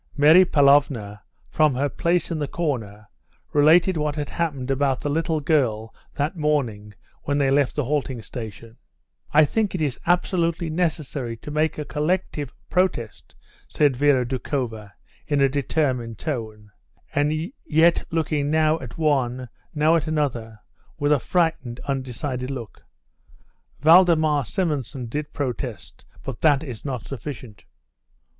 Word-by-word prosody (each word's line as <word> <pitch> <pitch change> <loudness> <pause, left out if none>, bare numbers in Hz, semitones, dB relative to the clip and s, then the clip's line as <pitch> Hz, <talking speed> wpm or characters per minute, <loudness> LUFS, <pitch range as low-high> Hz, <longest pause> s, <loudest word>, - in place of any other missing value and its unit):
Mary 155 +6 +7
Pavlovna 140 - +3 0.3
from 155 -4 +2
her 140 +3 +1
place 170 +5 0
in 165 - -2
the 145 - -2
corner 115 -11 -3 0.5
related 165 +5 +5
what 150 -1 -1
had 145 -2 -4
happened 140 -6 -2
about 135 -1 +1
the 145 - -3
little 160 +1 0
girl 120 -8 0 0.2
that 150 +6 -1
morning 125 -10 -1 0.3
when 145 0 0
they 140 -2 +2
left 140 -1 +2
the 150 - 0
halting 135 -2 -1
station. 115 -1 -8 0.6
"I 155 +1 +6
think 210 +5 -1
it - - -2
is 145 -5 -1
absolutely 170 -2 +1
necessary 150 -8 -2
to 150 - -9
make 155 +1 0
a 150 - -4
collective 150 -3 -2 0.2
protest," 160 - -1 0.3
said 145 -3 +2
Vera 135 -1 +3
Doukhova, 120 -4 -4 0.4
in 145 -1 +1
a 135 - +5
determined 130 -4 -1
tone, 110 -7 -5 0.4
and 155 - 0
yet 165 +2 +3
looking 155 -3 -1
now 155 +1 +2
at 125 -4 -9
one, 130 -5 0 0.3
now 155 +2 +4
at 165 -1 0
another, 120 -8 -2 0.4
with 145 0 0
a 150 - +4
frightened, 150 -6 -1
undecided 130 -1 -3
look. 120 -7 -7 1.0
"Valdemar 155 -3 +5
Simonson 145 - -2
did 145 +6 -4
protest, 125 -7 -5 0.2
but 135 -4 -6
that 150 -2 +4
is 125 -8 -8
not 130 -5 -4
sufficient." 120 - -8
145 Hz, 135 wpm, -23 LUFS, 125-155 Hz, 1.0 s, Mary